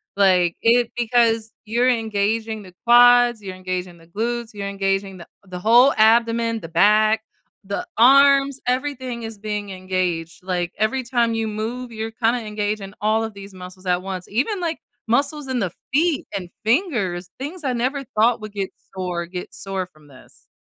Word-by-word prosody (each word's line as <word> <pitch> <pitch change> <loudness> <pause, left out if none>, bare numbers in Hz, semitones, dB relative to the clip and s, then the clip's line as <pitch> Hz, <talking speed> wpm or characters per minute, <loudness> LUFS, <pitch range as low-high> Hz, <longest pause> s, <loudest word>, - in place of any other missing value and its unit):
like, 185 -4 +3
it 235 +1 +3
because 230 -2 +2
you're 240 +4 +2
engaging 220 -1 -1
the 185 -2 -14
quads, 245 -1 +6
you're 190 -2 -7
engaging 185 -1 -5
the 165 - -19
glutes, 230 +4 -3
you're 200 -1 -5
engaging 195 -1 -1
the 170 - -11 0.2
the 180 -1 -7
whole 240 +7 +6
abdomen, 230 +1 +3
the 165 - -8
back, 215 +5 +4 0.4
the 200 - -3
arms, 275 +2 +5
everything 255 -2 -2
is 225 -2 -7
being 210 -1 -4
engaged, 185 -3 -3
like, 180 -2 -2
every 220 +5 0
time 235 -1 +1
you 225 -1 -1
move, 230 +4 -4
you're 225 0 -5
kinda 230 +1 +1
engaging 210 -1 -3
all 220 +1 +2
of 220 -1 -5
these 200 0 -11
muscles 185 +1 -11
at 180 0 +1
once. 185 -2 -5
Even, 280 - -1
like, 335 -2 -2 0.3
muscles 280 +4 0
in 255 -2 -1
the 185 -6 -1 0.2
feet 315 +2 +1
and 180 -3 -5
fingers, 215 - 0
things 310 +6 -6
I 260 -3 0
never 260 +4 -1
thought 230 -1 +1
would 215 0 -7
get 195 -2 -3 0.3
sore 180 -2 -3
get 180 +1 -7
sore 190 -2 -4
from 155 -4 -22
this. 130 -2 -18
220 Hz, 170 wpm, -22 LUFS, 190-240 Hz, 0.4 s, quads